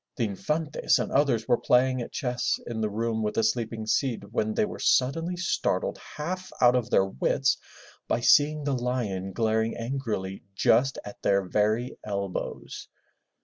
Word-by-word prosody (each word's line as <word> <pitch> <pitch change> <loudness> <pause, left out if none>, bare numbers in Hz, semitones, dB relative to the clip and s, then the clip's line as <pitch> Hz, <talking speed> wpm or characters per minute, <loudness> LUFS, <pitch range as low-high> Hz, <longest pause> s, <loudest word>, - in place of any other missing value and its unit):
The 120 - -1
Infantes 150 +9 0
and - - -2
others 130 -6 +2
were 120 -2 +3
playing 130 0 +3
at 120 - -6
chess 125 -6 -1
in 115 -2 -4
the 110 - 0
room 110 +1 -1
with 105 -1 -2
the 115 - +2
sleeping 110 0 -1
Cid 110 -3 -1
when 110 -2 0
they - - +2
were 205 - -7
suddenly 165 +7 +2
startled 175 - -1 0.2
half 185 +5 -4
out 125 0 +6
of 120 -2 0
their 95 - +4
wits 95 -9 +1 0.5
by 120 - 0
seeing 145 +5 +4
the 140 -1 0
lion 120 -7 -2
glaring 110 +1 0
angrily 115 -6 -3
just 135 +7 +3
at 105 - -10
their 100 0 +2
very 110 +6 0
elbows. 100 -2 -4
120 Hz, 160 wpm, -27 LUFS, 110-135 Hz, 0.5 s, out